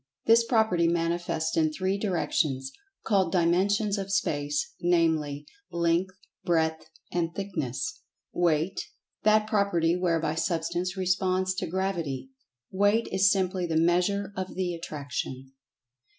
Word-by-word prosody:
This 230 +1 +6
property 220 -8 +2
manifests 170 -1 -1
in 155 -1 +2
three 185 +4 -1
directions, 155 -9 0 0.3
called 190 -5 +2
Dimensions 195 +4 +2
of 195 0 -4
Space, 145 -5 -1
namely, 160 -4 +1 0.3
Length, 170 +2 +1 0.3
Breadth, 160 -3 0 0.2
and 170 -1 -1
Thickness. 195 - -3 0.3
Weight: 170 0 +1 0.4
That 215 0 +4
property 200 -6 +2
whereby 165 -4 0
Substance 170 +2 -1
responds 185 0 +1
to 185 -1 -3
Gravity. 180 - -2 0.4
Weight 205 +4 +2
is 195 +1 +4
simply 185 -2 0
the 160 -1 0
measure 180 +4 +1
of 185 0 -5
the 185 -2 -1
attraction. 140 -5 -5
175 Hz, 115 wpm, -27 LUFS, 165-190 Hz, 0.4 s, This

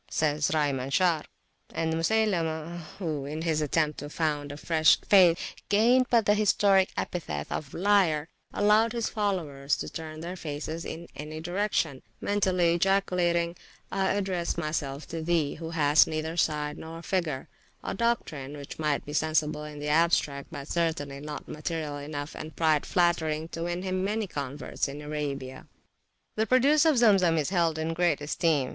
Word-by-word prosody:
says 150 -1 +1
Rai 150 -2 +2
Manshar. 145 +5 +1 0.5
And 160 -1 0
Musaylimah, 170 -3 0 0.2
who 155 -7 -3
in 155 +3 -4
his 160 -2 +1
attempt 150 0 0
to 145 - -6
found 150 -2 -1
a 145 - -7
fresh 160 0 +4
faith, 180 -4 +5 0.3
gained 240 +5 +4
but 230 -3 +4
the 205 - +5
historic 200 -2 +3
epithet 75 - -3
of 145 -2 -4
Liar, 180 -6 +3 0.2
allowed 215 +2 +3
his 235 -2 -1
followers 150 - -1
to - - -5
turn 155 -1 -7
their 175 +2 -5
faces 160 0 -5
in 170 +1 -6
any 155 +2 -6
direction, 175 -5 -1 0.2
mentally 185 -4 +2
ejaculating, 175 -2 +1 0.4
I 195 0 +1
address 190 -4 -1
myself 155 -3 -3
to 165 0 -4
thee, 160 -3 +1
who 165 0 -7
hast 155 -2 +4
neither 160 +1 -3
side 150 -2 0
nor 165 +1 -8
figure; 165 -9 -2 0.4
a - - -3
doctrine 155 - -2
which 140 +1 -9
might 150 -2 0
be 145 - -7
sensible 155 -1 0
in 150 -1 -8
the 145 0 -4
abstract, 150 -3 +2
but 145 -4 -7
certainly 160 -5 -1
not 150 +1 -7
material 155 -1 -4
enough 145 0 -6
and 155 - -8
pride 155 -3 +2
flattering 160 -3 +1
to 165 - -6
win 175 +1 -3
him 185 0 -1
many 215 +2 -1
converts 145 -5 -4
in 140 +1 -7
Arabia. 145 -3 -5 0.7
The 220 +1 +1
produce 280 +5 +4
of 310 -4 +4
Zemzem 195 -8 +5
is 150 +2 0
held 170 -4 +2
in 160 +1 -2
great 170 -3 +2
esteem. 145 -2 0
160 Hz, 160 wpm, -28 LUFS, 150-185 Hz, 0.7 s, faith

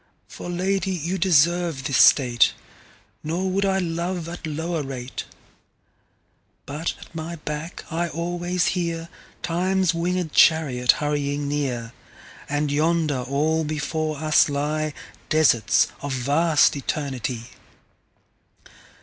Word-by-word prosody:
For - - -8
Lady 190 +2 0
you 180 +1 -2
deserve 170 -3 +3
this 130 -3 +1
State; 125 -4 +5 0.7
Nor 180 +5 -1
would 195 +1 +1
I 190 -1 +2
love 170 -1 -2
at 170 -1 -6
lower 160 +2 -2
rate. 130 -2 -6 1.4
But 150 +4 -3
at - - -14
my 165 +1 -5
back 150 +2 -6
I 170 +1 -1
alwaies 175 +2 -1
hearTimes 175 +1 -2
winged 175 -1 -1
Charriot 130 -7 +4
hurrying 145 -1 -2
near:And 140 +2 -4
yonder 155 -1 +1
all 150 +5 0
before 155 0 -2
us 155 +1 +4
lyeDesarts 150 -4 +1
of 145 -1 -3
vast 145 +6 +3
Eternity. 130 -4 -4
155 Hz, 100 wpm, -23 LUFS, 145-170 Hz, 1.4 s, State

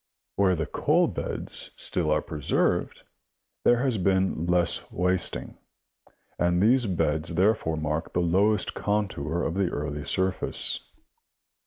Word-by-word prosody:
Where 95 -2 +3
the 80 -2 -2
coal - - +1
beds - - -1
still 75 - +1
are 75 0 +1
preserved, 75 -4 -1 0.6
there 120 +1 +3
has 125 -6 0
been 95 -2 0
least 90 -1 +1
wasting, 90 0 -2 0.8
and 90 0 +2
these 120 +4 +3
beds 80 -2 -1
therefore 95 -3 +1
mark 75 +1 -3
the - - 0
lowest 100 +5 +2
contour 95 -6 -2
of - - -1
the 95 -1 0
early 75 -1 -4
surface. 95 0 +1
90 Hz, 125 wpm, -26 LUFS, 80-100 Hz, 0.8 s, Where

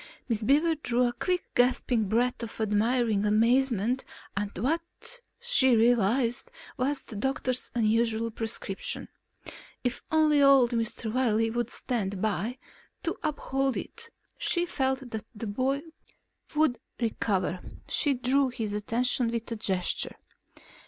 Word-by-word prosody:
Miss 230 -3 0
Beaver 295 +8 +3
drew 250 -6 0
in - - +4
a - - -6
quick 360 +6 -1
gasping 245 -2 +2
breath 240 +5 0
of 230 -1 -7
admiring 220 0 +1
amazement 235 +2 +2 0.3
at 205 -1 -3
what 285 - +1 0.6
she 470 - +5
realized 235 +2 +2 0.3
was 275 +1 -1
the 220 - -9
doctor's 255 +2 -1
unusual 225 0 +1
prescription. 220 -3 -2 0.7
If 245 -1 -2
only 310 -2 +4
old 275 -3 +6
Mr. 225 -1 -2
Wiley 225 -3 +2
would 240 0 -2
stand 205 -8 -2
by, 215 +4 -1 0.5
to 335 - -1
uphold 270 -2 -1
it, 465 0 -7 0.3
she 345 0 +1
felt 265 -5 -2
that 220 -1 -5
the 215 - -6
boy 260 +7 -1 0.7
would 300 -5 +2 0.2
recover. 200 -6 -1 0.3
She 285 -2 +3
drew 260 +2 +2
his 225 -4 -4
attention 235 +4 +1
with 230 0 -4
a - - -1
gesture. 190 -4 +1
240 Hz, 130 wpm, -28 LUFS, 220-265 Hz, 0.7 s, old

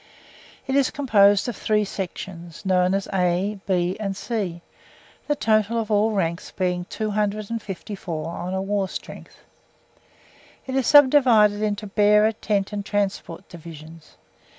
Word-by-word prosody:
It 265 - -2
is 275 -2 +3
composed 205 -7 +3
of 240 - -3
three 210 -1 0
sections, 180 -3 -7
known 185 0 +2
as 195 - -2
A, 185 +2 0
B, 180 -1 +1
and 195 -3 -3
C, 190 -9 -4 0.6
the 295 - +1
total 220 -2 +1
of 220 -1 -4
all 210 +1 +3
ranks 170 -3 -2
being 180 -1 -2
254 205 -5 -4
on 180 +2 -4
a 190 - -2
war 195 -1 -1
strength. - - -10 1.2
It 260 - -5
is 265 -3 +1
subdivided 255 -8 +5
into 210 0 -2
Bearer, 210 +1 +4
Tent 210 -2 -2
and 205 -1 -3
Transport 195 -3 -3
Divisions. 165 -2 -12
200 Hz, 130 wpm, -23 LUFS, 180-215 Hz, 1.2 s, subdivided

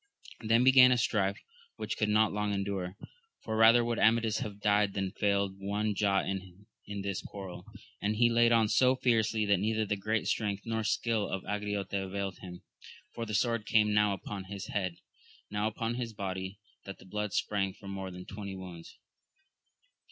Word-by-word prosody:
Then 115 +1 +3
began 130 -1 +8
a 125 - +4
strife 100 -4 +1 0.4
which - - -4
could 110 - 0
not 105 0 +3
long 105 0 -1
endure, 100 -1 -3 0.5
for 110 - -3
rather 115 +2 +6
would 120 -1 -1
Amadis 110 -1 +3
have 105 -1 -6
died 105 -1 +2
than 95 -1 -1
failed 100 -2 0
one 105 +2 -1
jot 100 -1 +1
in 95 0 -6 0.4
this 100 -1 -2
quarrel, 95 -3 -8 0.4
and 105 +1 0
he 120 +2 +4
laid 120 0 +4
on 115 -2 +4
so 130 +4 +4
fiercely 110 -3 +1
that 100 -2 +3
neither 110 +2 0
the 105 - -1
great 110 +2 -1
strength 100 -2 -1
nor 110 -1 -1
skill 110 -1 0
of 95 - -3
Angriote 105 -1 -3
availed 95 0 -3
him; 90 -1 -10 0.5
for 115 -1 -5
the 105 - -2
sword 115 +1 0
came 105 -2 +3
now 105 -1 +3
upon 95 0 -6
his 100 0 -7
head, 95 -4 -2 0.6
now 105 +1 0
upon 115 +1 -2
his 120 -2 -4
body, 95 -1 -4 0.3
that 100 - -8
the - - -16
blood 105 +2 -3
sprang 95 0 0
from 100 0 -10
more 95 -1 -5
than 90 0 -9
twenty 100 -1 -7
wounds. 90 -3 -10
105 Hz, 180 wpm, -31 LUFS, 95-110 Hz, 0.6 s, began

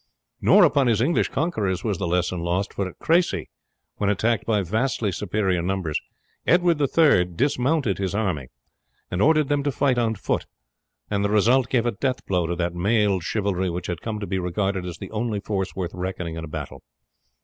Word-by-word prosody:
Nor - - +6
upon 140 -3 +4
his 115 -3 +3
English 140 +9 +2
conquerors 105 - -1
was 105 -6 -1
the 95 - -1
lesson 90 +1 0
lost, 90 +3 -1
for 100 - -2
at - - -15
Cressy, 170 +2 +1 0.5
when 100 - 0
attacked 110 +3 0
by 105 -3 +2
vastly 110 +2 0
superior 95 -2 0
numbers, 90 -3 -1 0.5
Edward 175 -3 +3
III 140 - +4
dismounted 125 - 0
his 95 0 -2
army, 90 - -1 0.6
and 90 - -1
ordered 155 +2 +4
them 145 0 +1
to 145 0 0
fight 130 -2 +1
on 115 -1 +1
foot, - - -2 0.6
and 100 -1 +1
the 100 - +1
result 115 +5 +3
gave 120 -2 +1
a 120 - +2
death 130 +4 -2
blow 90 -3 0
to 85 - -1
that 85 0 -1
mailed 100 +1 +2
chivalry 95 -1 -1
which 90 +1 -4
had 85 -2 -4
come 110 -2 -4
to 105 - -4
be 95 -1 -2
regarded 95 +1 -1
as 85 -1 -6
the - - -8
only 110 -1 -2
force 95 -2 -3
worth 90 -2 -3
reckoning 90 -2 -4
in 80 - -5
a - - -6
battle. 75 -2 -7
100 Hz, 195 wpm, -24 LUFS, 90-120 Hz, 0.6 s, Nor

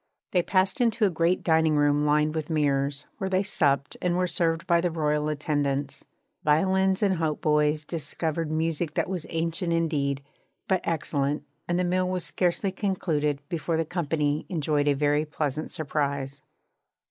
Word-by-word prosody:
They 180 - +3
passed 190 +8 +1
into 230 -2 +3
a 195 - +2
great 170 +2 +1
dining 160 -2 +3
room 145 0 +3
lined 150 +1 +2
with 155 -1 -3
mirrors, 140 -2 0
where 190 - -2
they 190 +1 +2
supped 140 -8 +1
and 175 -1 +1
were 180 - +2
served 165 -1 0
by 170 -2 +3
the 175 - +1
royal 150 -2 0
attendants. 145 -2 -1 0.4
Violins 190 +6 +2
and 190 -3 +2
hautboys 150 -1 +1
discoursed 160 0 -3
music 160 0 -1
that - - +1
was 180 -3 -4
ancient 165 +1 -1
indeed, 145 -4 0 0.4
but 190 -2 +2
excellent, 145 -3 -1 0.2
and 175 - 0
the 180 - +1
meal 180 +1 +1
was 180 -3 -2
scarcely 180 +3 0
concluded 155 -8 -1
before 165 -1 -1
the 165 - 0
company 150 -3 -1
enjoyed 150 -4 0
a 145 - +5
very 145 +1 +2
pleasant 150 -1 -3
surprise. 140 -2 -2
160 Hz, 160 wpm, -26 LUFS, 145-175 Hz, 0.4 s, a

